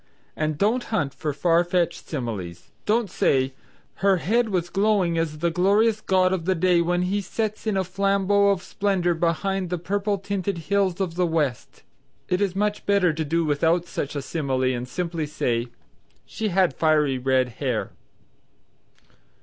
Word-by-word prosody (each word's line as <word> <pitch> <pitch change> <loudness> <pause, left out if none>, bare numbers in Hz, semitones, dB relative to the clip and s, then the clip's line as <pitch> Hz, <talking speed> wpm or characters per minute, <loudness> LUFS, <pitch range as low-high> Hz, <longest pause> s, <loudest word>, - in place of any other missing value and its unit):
And 155 -1 -1
don't 225 +7 +1
hunt 145 - -1
for 150 - -3
farfetched 170 +3 +1
similes. 100 - -5 0.2
Don't 220 +1 +2
say 135 -6 +1 0.4
"Her 195 +1 +3
head 225 +6 +1
was 175 -3 -1
glowing 195 -4 +2
as 155 -2 -2
the 170 +2 0
glorious 205 +5 +2
god 185 -2 +2
of 175 -3 -2
day 180 -1 +4
when 175 +1 +1
he 200 +3 0
sets 215 +3 -3
in 210 -3 +1
a 190 - +1
flambeau 200 +2 +2
of 195 -2 0
splendor 190 -4 0
behind 175 +3 -1
the 180 - -1
purple 200 +4 -1
tinted 195 -1 -3
hills 190 +2 0
of 185 -4 -1
the 180 +1 +1
West." 150 -6 -2 0.5
It 180 +1 +1
is 195 -2 0
much 210 +1 -1
better 200 -5 +3
to 160 +1 -2
do 165 +2 0
without 165 +4 +1
such 150 -4 -4
a 140 - -3
simile 135 -3 -2
and 120 0 -4
simply 170 0 -3
say 120 -5 -1 0.6
"She 220 - -3
had 185 -5 +2
fiery 150 -3 +2
red 130 0 +2
hair." 125 -6 -1
175 Hz, 160 wpm, -24 LUFS, 155-200 Hz, 0.6 s, day